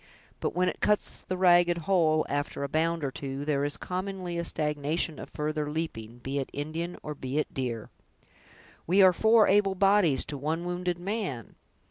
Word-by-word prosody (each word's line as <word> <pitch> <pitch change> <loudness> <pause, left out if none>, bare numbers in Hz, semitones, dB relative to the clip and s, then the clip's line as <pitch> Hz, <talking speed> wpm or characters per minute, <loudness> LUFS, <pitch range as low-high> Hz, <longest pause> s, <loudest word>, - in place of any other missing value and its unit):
But - - -2
when 180 +1 +2
it - - -2
cuts 210 0 +1
the 185 - -4
ragged 175 -1 +5
hole, 160 -3 +2
after 145 0 -2
a - - -1
bound 165 +2 0
or 135 - -1
two, 135 +1 -5
there 145 -2 +1
is, 145 0 -1
commonly, 185 -1 -4
a - - -1
stagnation 150 0 -1
of - - -8
further 150 0 -2
leaping, 120 -8 -4
be 135 +3 -3
it 135 - -4
Indian 160 +4 -4
or 150 - -4
be 135 -1 -4
it 155 - -1
deer!" 120 -4 -4 1.0
"We 190 +4 +5
are 185 -1 +7
four 220 +3 +5
able 195 -1 +3
bodies, 195 -7 +3
to 145 -2 -5
one 160 +4 -2
wounded 180 0 -2
man!" 180 - -4
160 Hz, 180 wpm, -28 LUFS, 145-180 Hz, 1.0 s, are